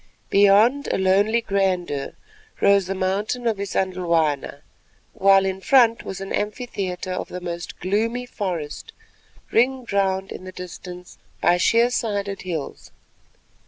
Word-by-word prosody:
Beyond, 205 +8 +5
in 190 - 0
lonely 205 +5 +3
grandeur, 185 -9 -1 0.5
rose 200 -2 +4
the 195 - -2
mountain 200 +6 -1
of 225 -3 +1
Isandhlwana, 170 -8 -1 0.5
while 195 -2 +4
in 190 0 -3
front 235 0 +4
was 195 - -6
an 195 0 -5
amphitheatre 205 -4 -3
of 185 - -3
the 180 - -6
most 175 -1 -6
gloomy 230 +6 -1
forest, 175 -10 -5 0.6
ringed 250 -1 +1
round 190 -1 0
in - - -7
the 185 - -8
distance 180 0 -10 0.2
by 175 - +3
sheer 230 +6 +3
sided 200 -4 -2
hills. 165 -6 -5
195 Hz, 125 wpm, -23 LUFS, 180-215 Hz, 0.6 s, Beyond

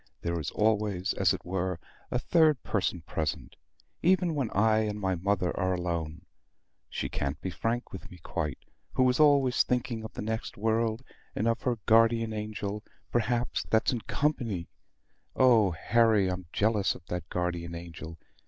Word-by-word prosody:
There 85 0 -1
is 75 - -3
always, 105 -3 +1
as 95 -3 +3
it 95 - -3
were, 90 -1 -2 0.3
a - - 0
third 155 0 +3
person 95 -4 -1
present, 80 -1 -3 0.5
even 180 -1 +3
when 135 -7 -1
I 110 +2 +3
and 105 -1 -1
my 95 -2 0
mother 90 0 0
are 95 -1 0
alone. 85 -3 -3 0.6
She - - -3
can't 70 +1 -3
be 95 - -4
frank 115 +6 -2
with 95 - -8
me 90 - -12
quite; 75 -3 -3 0.4
who 130 - +3
is 125 - -2
always 140 -4 +5
thinking 120 -2 -1
of 110 - -8
the - - -5
next 110 +1 -4
world, 110 +2 0 0.3
and 110 - 0
of 115 +1 +1
her 125 -2 0
guardian 115 0 +4
angel, 105 -1 -4 0.3
perhaps 120 +1 0
that's 110 +3 +3
in 120 - -2
company. 115 - -1 0.7
Oh, 115 -6 +5
Harry, 105 +3 +3
I'm 90 -1 -5
jealous 105 -2 +1
of 85 - -13
that 90 -1 -5
guardian 85 -1 -2
angel!" 85 -1 -8
105 Hz, 160 wpm, -29 LUFS, 90-115 Hz, 0.7 s, always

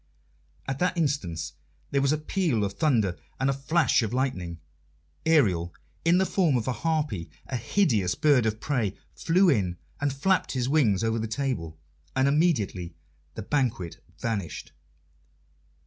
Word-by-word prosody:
At 135 - -3
that 180 0 +1
instant 90 - -1 0.4
there 140 - +2
was 140 0 +2
a 155 - +2
peal 155 - 0
of 100 -1 -2
thunder 110 - +1 0.2
and 135 +1 +2
a - - 0
flash 155 +4 +2
of 110 -2 -2
lightning. 90 -11 -2 0.7
Ariel, 95 - +3 0.3
in 170 +2 +4
the 190 - +3
form 170 -9 +2
of 115 - -3
a - - +2
harpy, 150 - -1 0.2
a 130 - -4
hideous 115 - +1
bird 140 -7 +4
of 110 0 -2
prey, 110 -6 -1 0.2
flew 185 +4 +3
in 95 - +2 0.2
and 145 -1 0
flapped 185 +8 +1
his 125 -2 0
wings 120 -9 +3
over 115 0 +1
the 110 - -2
table, 110 - -3 0.4
and 130 +1 +3
immediately 115 - +1 0.4
the 110 - -5
banquet 110 - -1
vanished. 100 -10 -4
130 Hz, 150 wpm, -27 LUFS, 100-150 Hz, 0.7 s, in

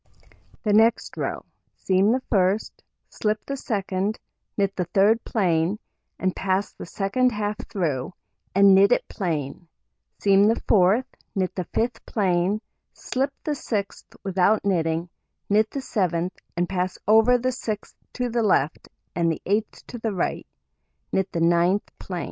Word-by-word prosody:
The 210 -3 +1
next 225 +2 +3
row: - - -3 0.3
Seam 190 +3 +2
the 255 +1 0
1st, 195 +1 +2 0.4
slip 210 0 -2
the 275 - -4
2d, 200 -5 -2 0.4
knit 200 -1 +1
the 180 -3 -2
3d 205 +5 +4
plain, 180 -2 +1 0.4
and 185 -1 -1
pass 190 +1 -1
the - - -9
2d 200 +8 +1
half 210 -1 -2
through, 165 - -2 0.4
and 200 0 +7
knit 195 +2 +6
it 245 - +2
plain, 165 -4 -3 0.5
seam 200 0 +4
the 225 - +2
4th, 210 +5 +3 0.3
knit 185 -2 0
the 185 - -3
5th 230 +5 -1
plain, 190 0 +1 0.3
slip 270 +2 -2
the 305 - -2
6th 210 -8 -4
without 195 +2 +2
knitting, 165 -3 0 0.4
knit 215 +1 +4
the 275 - -4
7th, 180 -7 -1 0.3
and 175 0 +1
pass 185 0 -2
over 225 +3 +6
the 250 +1 0
6th 220 -4 -4 0.2
to 250 0 -1
the 240 0 0
left, 160 -8 +1 0.3
and 170 -1 +2
the 160 - -3
8th 210 +2 -1
to 240 - -8
the 225 -2 -2
right, - - -2 0.6
knit 190 -1 0
the 170 - -2
9th 170 +3 +3 0.2
plain. 180 -2 -5
195 Hz, 150 wpm, -24 LUFS, 180-220 Hz, 0.6 s, and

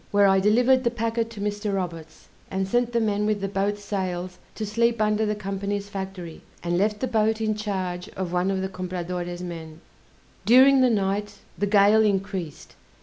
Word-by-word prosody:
where 205 0 +4
I 195 0 +5
delivered 245 +6 +4
the 235 - +2
packet 230 -1 -2
to 225 -3 -10
Mr. 205 0 -2
Roberts, 165 -4 -6 0.2
and 190 0 -2
sent 240 +3 +1
the 235 - +1
men 210 -2 0
with 215 -1 0
the 195 - -2
boat's 200 +1 -2
sails 185 -3 -3 0.2
to 220 - -3
sleep 230 +2 +1
under 215 0 +1
the 210 - 0
Company's 200 0 -4
Factory, 190 -4 -7 0.2
and 175 0 0
left 210 +3 0
the 260 - 0
boat 220 -1 +1
in 215 -1 0
charge 190 -3 -4
of 185 -2 -3
one 180 +1 +1
of 190 -1 -1
the - - -1
Compradore's 180 -1 -5
men; 165 -2 -8 0.6
during 260 +3 +6
the 255 - +5
night 205 -1 -1 0.2
the 205 - -1
gale 205 +1 +5
increased. 195 -6 -2
200 Hz, 185 wpm, -25 LUFS, 185-215 Hz, 0.6 s, during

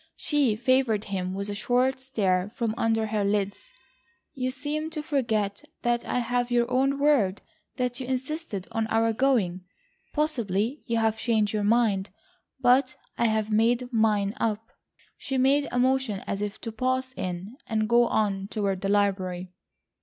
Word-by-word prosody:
She 285 -8 +1
favoured 245 -2 +2
him 190 -3 -3
with 200 +1 -3
a 205 - -3
short 250 +5 +1
stare 200 -7 0
from 230 -2 -1
under 225 -1 +1
her 215 -1 -1
lids. 200 - -1 0.6
"You 255 -1 -2
seem 295 +4 -3
to 310 -2 -5
forget 225 -7 -1 0.2
that 240 0 +1
I - - -1
have 245 0 0
your 240 -1 +3
own 270 +2 +2
word 275 -10 +2 0.3
that 250 0 -1
you 255 - -5
insisted 260 - -3
on 225 -1 -1
our 225 0 +2
going. 215 -8 +1 0.5
Possibly 245 - 0
you 230 -1 0
have 220 -1 +1
changed 215 -3 +1
your 210 -1 0
mind, 210 -3 +2 0.5
but 260 +1 +3 0.2
I 235 - +3
have 220 -1 +1
made 240 +3 +2
mine 210 -3 +2
up." 225 +1 -2 0.5
She 270 - -3
made 275 +2 +3
a - - -2
motion 255 -5 +1
as 200 - -3
if 205 -1 -4
to 225 - -4
pass 255 +3 -1
in, 185 +6 -5
and 215 -1 0
go 235 +1 +4
on 195 -2 0
toward 200 -3 -2
the 195 - -1
library. 185 -3 0
225 Hz, 160 wpm, -26 LUFS, 205-255 Hz, 0.6 s, go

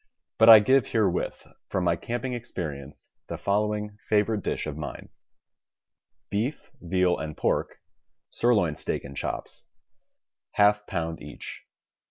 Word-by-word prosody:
But 110 +1 +8
I 110 - +13
give 130 +5 +4
herewith, 100 -6 0 0.2
from 95 - -1
my 85 -1 +3
camping 120 +6 -4
experi 90 - -5
ence, 70 +1 -11 0.2
the - - -5
following 105 +1 -1
favorite 105 0 +2
dish - - -2
of 75 -2 -4
mine: 75 -1 -7 1.2
Beef, 115 +9 -2
veal, 90 0 +1
and 75 -1 -5
pork - - 0 0.5
(sirloin 105 -10 +2
steak - - -3
and 70 -1 -9
chops), - - -4 0.9
J^ 105 0 +4
pound 80 0 -3
each. 75 0 -9
100 Hz, 130 wpm, -27 LUFS, 85-110 Hz, 1.2 s, I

